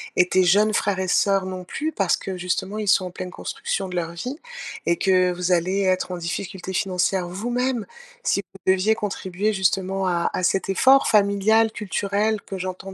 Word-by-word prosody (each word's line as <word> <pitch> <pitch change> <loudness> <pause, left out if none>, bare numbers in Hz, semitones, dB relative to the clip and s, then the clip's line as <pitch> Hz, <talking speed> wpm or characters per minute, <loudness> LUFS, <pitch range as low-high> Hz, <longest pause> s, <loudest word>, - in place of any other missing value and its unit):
et 180 0 +3
tes 185 -1 +3
jeunes 210 +4 +4
frères 200 -2 0
et 185 -1 -2
sœurs 195 0 +2
non 185 -1 -6
plus 310 - -3
parce 195 - +1
que 190 -1 -6
justement, 180 +3 -2
ils 215 -1 -3
sont 185 -1 +3
en - - -9
pleine 180 0 -6
construction 195 +1 -4
de 180 - -4
leur 165 -1 -2
vie. 250 - -6 0.5
Et 170 - +3
que 185 -2 +3
vous 180 +1 -2
allez 185 +3 +2
être 185 -1 0
en - - -4
difficulté 185 +2 -5
financière 185 -1 0
vous-même 240 +6 -2 0.4
si - - +1
vous 190 0 -2
deviez 200 +4 +2
contribuer 200 0 -2
justement 190 -1 0
à 170 -1 +1
à 185 - -2
cet 195 +1 +1
effort 265 +7 +5
familial, 215 +2 +3
culturel, 205 0 -1
que 195 - -7
j'entends 185 +1 -6
190 Hz, 190 wpm, -23 LUFS, 180-205 Hz, 0.5 s, effort